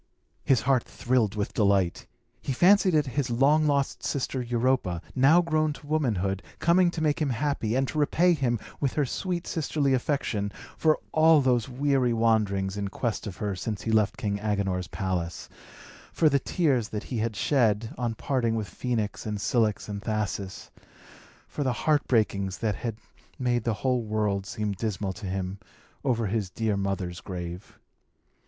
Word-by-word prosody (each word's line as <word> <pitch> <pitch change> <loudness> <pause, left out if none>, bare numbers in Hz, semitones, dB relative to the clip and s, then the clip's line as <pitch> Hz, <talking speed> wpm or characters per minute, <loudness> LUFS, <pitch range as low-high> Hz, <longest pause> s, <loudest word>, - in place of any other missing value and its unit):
His 130 -4 +3
heart 130 +2 +3
thrilled 120 -5 0
with 105 -1 -2
delight. 100 -4 +1 0.3
He 135 - -2
fancied 185 - +5
it 150 -2 +3
his 135 0 -2
long 145 +6 +3
lost 140 -1 0
sister 135 -1 -2
Europa, 120 -6 0
now 150 +7 +5
grown 155 -2 +1
to 145 - -14
womanhood, 105 - 0 0.2
coming 175 +1 +4
to 165 -2 -3
make 150 0 +1
him 150 - +1
happy, 125 -3 -1
and 135 +1 +1
to 155 - -3
repay 175 +4 +3
him, 130 -6 0 0.2
with 140 -3 0
her 150 - +1
sweet 175 +6 -3
sisterly 145 -4 0
affection, 120 -6 -1 0.2
for 155 -1 +3
all 160 0 +6
those 125 -3 +1
weary 130 -2 +1
wanderings 105 -4 +1
in 100 -1 -2
quest 115 +2 -3
of 95 - -7
her 100 -2 -2
since 105 +3 -4
he 115 - -1
left 110 -3 +2
King 100 -1 -2
Agenor's 100 -3 -1
palace 90 -3 -3 0.6
for 160 - +3
the 140 -1 +2
tears 135 - +1
that 105 - -4
he 120 - -4
had 110 0 -1
shed, 110 -1 +1
on 120 -2 -2
parting 115 -2 0
with 105 -5 -3
Phœnix, 110 -3 -2
and 105 -1 -3
Cilix, 110 -1 +1
and 100 -1 -5
Thasus 100 -3 -3 0.8
for 145 - -3
the 130 -2 +1
heart 150 -2 +3
breakings 100 -5 +1
that 110 -2 0
had 115 -3 -4 0.4
made 120 -3 0
the 115 -2 +1
whole 125 -2 +2
world 105 -3 -1
seem 105 0 -2
dismal 100 -1 -3
to 105 0 -7
him 95 +1 -3 0.4
over 120 -4 +1
his 100 -1 -1
dear 110 +2 -1
mother's 95 -2 -3
grave. 90 0 -7
115 Hz, 170 wpm, -27 LUFS, 100-140 Hz, 0.8 s, all